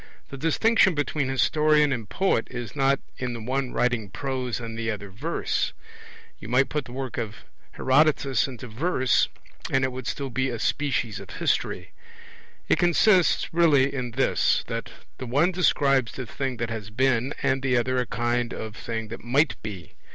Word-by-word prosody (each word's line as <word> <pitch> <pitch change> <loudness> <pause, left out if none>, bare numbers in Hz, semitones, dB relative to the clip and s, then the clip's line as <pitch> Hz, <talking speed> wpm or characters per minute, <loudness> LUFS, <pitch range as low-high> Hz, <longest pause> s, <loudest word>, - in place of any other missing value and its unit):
The - - -7
distinction 190 - +3
between 145 -1 -1
historian 150 +2 +3
and 115 -5 -5
poet 190 -12 +1
is 120 0 -6
not 135 -1 +2 0.2
in 125 -2 -2
the 115 - -5
one 130 +3 -2
writing 120 -4 0
prose 130 +1 -3
and 115 -1 -6
the 115 0 -2
other 100 -2 -5
verse 100 - -2 0.7
you 105 - -9
might 125 +4 +3
put 150 -3 -2
the 120 - -11
work 130 -1 -4
of 110 -3 -5 0.3
Herodotus 140 -1 +3
into 125 -2 -8
verse, 130 +2 +1 0.4
and 135 0 +2
it 130 - +1
would 130 -1 -6
still 140 -2 -3
be 130 +1 0
a 120 - -3
species 125 -4 -1
of 100 - -11
history; - - -1 0.8
it - - +3
consists 175 +1 +3
really 145 -5 +4
in 125 -3 -3
this, 130 +2 +2
that - - -4 0.3
the 130 - -5
one 145 +9 +3
describes 140 -8 +2
the 130 - -5
thing 130 +2 -3
that 115 0 -3
has 110 -3 -5
been, 130 +3 +1
and 135 -1 +2
the 130 -2 +2
other 125 +2 +1
a 125 - -1
kind 120 +1 -1
of 110 0 -6
thing 115 -2 -5
that 115 - -8
might 135 +5 +2
be. 100 -5 -8
130 Hz, 175 wpm, -25 LUFS, 115-140 Hz, 0.8 s, really